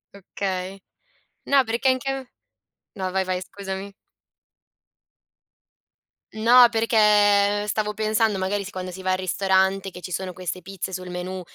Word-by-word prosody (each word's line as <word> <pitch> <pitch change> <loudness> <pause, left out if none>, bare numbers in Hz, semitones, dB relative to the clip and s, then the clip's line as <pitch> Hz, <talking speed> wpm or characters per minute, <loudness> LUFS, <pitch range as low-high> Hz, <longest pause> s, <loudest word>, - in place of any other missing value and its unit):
Okay. 190 0 -5 0.7
No, 275 -2 +4
perché 235 +3 0
anche 260 +1 +1
a 270 -1 -4 0.7
no, 185 -2 -3
vai, 190 0 +1
vai, 185 -1 -2
scusami. 195 +1 -7 2.4
No, 240 +3 +7
perché, 210 -2 +3
stavo 210 0 -1
pensando, 215 -1 +1
magari, 195 +1 -2
si 195 - -8
quando 185 0 -6
si 190 +1 -9
va 185 - 0
al 185 - 0
ristorante, 190 +1 +1
che 180 - -11
ci 180 - -8
sono 185 +2 -3
queste 185 0 -5
pizze 190 +1 -6
sul 185 -1 -6
menù 180 +1 -5
195 Hz, 140 wpm, -23 LUFS, 185-215 Hz, 2.4 s, No